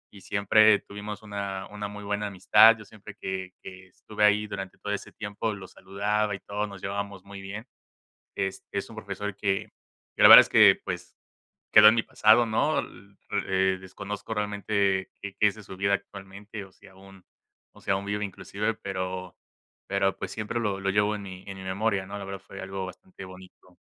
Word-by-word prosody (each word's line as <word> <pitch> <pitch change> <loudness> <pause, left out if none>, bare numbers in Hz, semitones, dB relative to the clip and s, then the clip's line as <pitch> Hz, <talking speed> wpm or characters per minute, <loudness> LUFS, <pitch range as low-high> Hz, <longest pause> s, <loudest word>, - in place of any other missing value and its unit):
y 100 - -13
siempre 105 +2 +4
tuvimos 105 +1 -8
una 100 -2 -5
una 105 0 -5
muy 105 0 -9
buena 105 +1 -2
amistad, 105 +4 +6
yo 105 - -12
siempre 100 -1 -13
que 95 -1 -4
que 95 0 -11
estuve 105 +3 -5
ahí 105 +1 +4
durante 95 -2 -7
todo 105 - -4
ese 100 - -6
tiempo, 105 +1 -4
lo 95 -2 -10
saludaba 105 +2 -2
y - - -9
todo, 105 +2 -4
nos 100 -2 -11
llevábamos 100 -1 -4
muy 100 0 -10
bien, 100 +4 -7 0.7
este, 95 -1 -3
es - - -3
un - - -12
profesor 105 -1 -5
que 100 -2 -1 0.5
que - - 0
la - - +11
verdad - - +13
es - - +1
que, - - +6
pues, - - -6 0.6
quedó 105 0 +10
en 110 - +3
mi 115 - +1
pasado, 110 +3 +4
¿no? 130 +8 +1
L 100 0 -10 0.3
eh, 95 0 +2
desconozco 100 +3 -6
realmente 100 -2 0
qué 100 -1 -7
qué 105 - +4
es 100 - -1
de 110 - -12
su 95 - -10
vida 100 +1 0
actualmente, 100 +1 -9
o 95 - -15
si - - -19
aún 95 0 -17 0.5
o - - -18
si - - -2
aún 95 +1 0
vive 105 +1 -2
inclusive, 100 +3 -3
pero 95 -2 -5 0.5
pero, 100 0 0
pues, - - -5
siempre 110 +2 -3
lo 100 -3 -1
lo 100 0 -1
llevo 105 +2 +2
en 105 - -6
mi 95 -1 -9
en 95 0 -7
mi 95 - -9
memoria, 95 +1 -1
¿no? 100 +2 -7
La 100 - -6
verdad 95 0 -6
fue 100 - -9
algo 95 0 -5
bastante 95 +1 -11
bonito. 95 -1 -15
100 Hz, 200 wpm, -27 LUFS, 95-105 Hz, 0.7 s, verdad